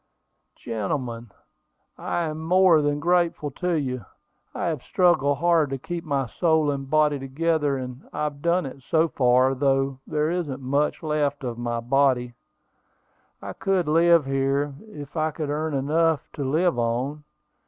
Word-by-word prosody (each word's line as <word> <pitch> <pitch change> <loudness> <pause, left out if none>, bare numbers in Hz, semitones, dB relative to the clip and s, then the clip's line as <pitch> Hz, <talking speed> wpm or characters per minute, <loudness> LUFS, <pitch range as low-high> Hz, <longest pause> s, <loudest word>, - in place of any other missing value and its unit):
"Gentlemen, 115 +1 -4 0.7
I 175 - -2
am 155 -1 -4
more 180 -1 +5
than 145 0 0
grateful 170 -2 +1
to 180 +6 -2
you. 130 -6 -2 0.5
I - - -4
have 160 -6 -2
struggled 160 -6 +2
hard 165 -1 +2
to 135 - -3
keep 170 +5 -5
my 140 -3 -1
soul 160 +3 +1
and 135 -1 -5
body 150 -1 +2
together, 145 +1 0
and 125 0 -8
I've 150 -2 -3
done 170 +1 +1
it 135 0 -8
so 160 +5 +1
far, 130 0 +3
though 135 0 0
there 150 +1 0
isn't 160 -7 -3
much 140 +5 -1
left 150 -2 -1
of 120 -2 -4
my 120 -1 -2
body. 125 -1 +1 1.1
I - - -6
could 190 -4 0
live 165 0 +4
here, 135 +1 0
if 150 -8 -10
I 155 -1 +1
could 150 -1 -4
earn 155 0 -2
enough 155 +3 +1
to 145 - -4
live 155 +2 +1
on. 125 +6 -2
145 Hz, 155 wpm, -24 LUFS, 135-160 Hz, 1.1 s, more